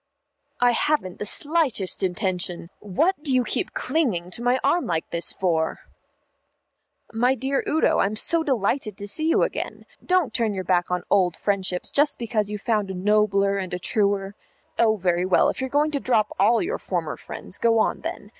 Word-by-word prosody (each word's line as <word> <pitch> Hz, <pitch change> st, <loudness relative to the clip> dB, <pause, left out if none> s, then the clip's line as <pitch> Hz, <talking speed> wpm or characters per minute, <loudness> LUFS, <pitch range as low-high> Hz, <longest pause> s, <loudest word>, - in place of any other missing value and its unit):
"I 245 Hz, 0 st, +4 dB
haven't 240 Hz, -7 st, 0 dB
the 210 Hz, -, -1 dB
slightest 285 Hz, -, +1 dB
intention 180 Hz, -2 st, -2 dB
what 295 Hz, -, 0 dB
do 295 Hz, -3 st, -2 dB
you 255 Hz, -1 st, +3 dB
keep -, -, -2 dB
clinging 235 Hz, -, -1 dB
to 230 Hz, -, -3 dB
my 245 Hz, +2 st, +2 dB
arm 335 Hz, +6 st, +1 dB
like 165 Hz, -2 st, -2 dB
this 170 Hz, 0 st, +2 dB
for? 165 Hz, -4 st, -1 dB, 1.3 s
"My 245 Hz, +4 st, +2 dB
dear 270 Hz, +2 st, -1 dB
Udo, 315 Hz, -, +2 dB
I'm 205 Hz, +2 st, +1 dB
so 335 Hz, +9 st, +3 dB
delighted 240 Hz, -6 st, -1 dB
to 205 Hz, 0 st, -7 dB
see 310 Hz, +10 st, -3 dB
you 330 Hz, -, +3 dB
again. -, -, -4 dB, 0.2 s
Don't 360 Hz, -9 st, +1 dB
turn 225 Hz, -4 st, 0 dB
your 190 Hz, -, -3 dB
back 175 Hz, -1 st, +1 dB
on 180 Hz, -1 st, -1 dB
old 180 Hz, -4 st, +2 dB
friendships 190 Hz, -3 st, -1 dB
just 290 Hz, +1 st, +2 dB
because 220 Hz, -3 st, -2 dB
you 210 Hz, -, -3 dB
have 205 Hz, -, -20 dB
found 210 Hz, -4 st, 0 dB
a 190 Hz, -, -4 dB
nobler 200 Hz, 0 st, +2 dB
and 185 Hz, -2 st, -3 dB
a -, -, -2 dB
truer 200 Hz, -1 st, 0 dB, 0.5 s
Oh, 220 Hz, -2 st, +4 dB
very 180 Hz, -3 st, 0 dB
well, 185 Hz, 0 st, +3 dB
if -, -, -4 dB
you're 265 Hz, -, -2 dB
going 295 Hz, +3 st, +1 dB
to 285 Hz, -, -1 dB
drop 225 Hz, -5 st, 0 dB
all 225 Hz, -, +4 dB
your 430 Hz, +8 st, -3 dB
former -, -, -3 dB
friends, -, -, -7 dB
go 230 Hz, -1 st, +3 dB
on 220 Hz, -, +1 dB
then. -, -, -6 dB
210 Hz, 190 wpm, -24 LUFS, 185-265 Hz, 1.3 s, I